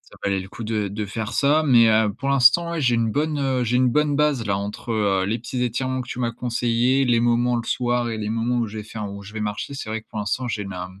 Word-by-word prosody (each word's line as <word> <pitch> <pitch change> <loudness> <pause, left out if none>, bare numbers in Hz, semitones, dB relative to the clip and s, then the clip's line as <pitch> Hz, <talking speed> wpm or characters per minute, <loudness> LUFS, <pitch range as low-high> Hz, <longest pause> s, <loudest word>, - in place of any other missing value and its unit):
ça - - -20
valait 100 -1 0
le 95 - -9
coup 115 - -8
de 105 -2 -1
de 105 +2 -4
faire 110 +2 -5
ça. 150 +3 +3
Mais, 120 -4 +6
heu, 110 -1 +3
pour 140 0 -3
l'instant 140 +6 +5
ouais, 170 -2 -2
j'ai 125 -3 +2
une 115 -1 +1
bonne, 150 +1 0
heu, 130 -2 0
j'ai 120 +1 +1
une 125 -1 +3
bonne 150 +1 +1
base 145 -6 +1
là, 100 -1 +1
entre, 105 +3 -5
heu, 100 -3 +1
les 110 +3 -1
petits 125 +2 -4
étirements 130 +2 -1
que 125 - -7
tu - - -6
m'as 120 -2 -1
conseillés, 120 +2 +1
les 120 -2 +3
moments 120 +1 +2
le 115 - -4
soir 120 -1 0
et 115 - -3
les 105 0 -3
moments 115 +2 0
où 115 - 0
je 110 +1 -7
vais 105 - -6
faire 105 -2 -6
où 100 0 -8
je 105 +2 -12
vais 110 - -4
marcher, 105 +6 -4
c'est 110 -5 -6
vrai 110 - -2
que 105 - -30
pour 110 - -6
l'instant, 120 +5 -2
j'ai 105 -2 -2
une, 95 -1 -7
hem, 90 +1 -8
115 Hz, 295 wpm, -23 LUFS, 105-125 Hz, -, Mais